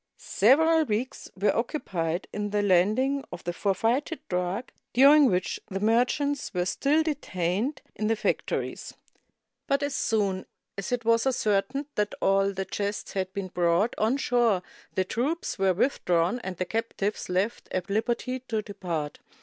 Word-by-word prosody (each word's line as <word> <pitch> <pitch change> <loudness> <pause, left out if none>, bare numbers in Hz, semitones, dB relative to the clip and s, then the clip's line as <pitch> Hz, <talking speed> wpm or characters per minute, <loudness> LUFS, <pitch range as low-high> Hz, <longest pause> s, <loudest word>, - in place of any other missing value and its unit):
Several 320 +8 +4
weeks 240 0 -3
were 205 - +2
occupied 180 - -2
in 210 0 -2
the 205 0 0
land 195 +2 +4
ing 270 +1 0
of 175 - -8
the 175 - -3
forfeited 225 - 0
drug, 180 +6 -2 0.2
during 280 +3 +7
which 180 -2 -1
the 195 -2 -4
merchants 250 +6 +1
were 180 0 +1
still 285 +11 +2
detained 225 - -2
in 215 - -1
the 225 - +2
factories; 215 - -2 0.7
but 280 +1 +1
as 285 -1 -1
soon 200 -7 0 0.3
as 200 +2 -5
it 245 -2 -1
was 230 +2 +3
ascertained 255 +3 0
that 210 0 -1
all 195 0 +3
the 190 0 -3
chests 200 +2 -3
had 190 -1 -2
been 190 -1 -4
brought 175 +6 +2
on 225 +5 +2
shore, 240 -8 +2 0.3
the 185 - +1
troops 270 - -2
were 195 -1 +4
withdrawn 180 -3 +1
and 190 -6 -6
the 185 - -1
captives 220 -1 -2
left 190 +6 -1
at 185 -1 -1
Kberty 240 +5 -1
to 220 -2 -1
depart. 175 -7 -4
210 Hz, 155 wpm, -27 LUFS, 185-255 Hz, 0.7 s, during